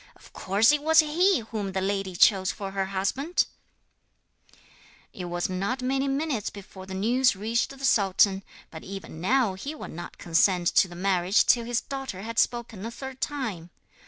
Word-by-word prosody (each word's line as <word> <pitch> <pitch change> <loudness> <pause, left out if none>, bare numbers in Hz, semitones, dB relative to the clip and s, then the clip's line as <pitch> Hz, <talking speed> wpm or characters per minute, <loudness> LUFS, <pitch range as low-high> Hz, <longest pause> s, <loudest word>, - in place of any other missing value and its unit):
Of - - -19
course 205 +6 +3
it 295 -1 +1
was 320 +2 +6
he 340 +2 +2
whom 205 -4 -3
the 190 - 0
lady 195 -1 -2
chose 190 0 +4
for 195 -1 -6
her 195 0 -1
husband!' 200 - 0 1.7
It 180 - -6
was 175 0 -2
not 200 +8 -2
many 270 +2 0
minutes 275 -5 -1
before 190 -1 -11
the 190 - -6
news 245 +5 +2
reached 225 +4 -1
the 275 0 -6
sultan; 195 -3 +3 0.3
but 160 - -9
even 185 -4 -8
now 235 +1 +2
he 275 +11 -6
would - - -8
not 175 +2 -9
consent 175 +1 +2
to - - +6
the 175 - -11
marriage 185 +1 +2
till 235 -1 +3
his 240 0 -1
daughter 265 -9 -6
had 230 0 -2
spoken 235 -5 -1
a 225 - -4
third 265 +2 -9
time. 220 - -4
205 Hz, 175 wpm, -26 LUFS, 190-260 Hz, 1.7 s, was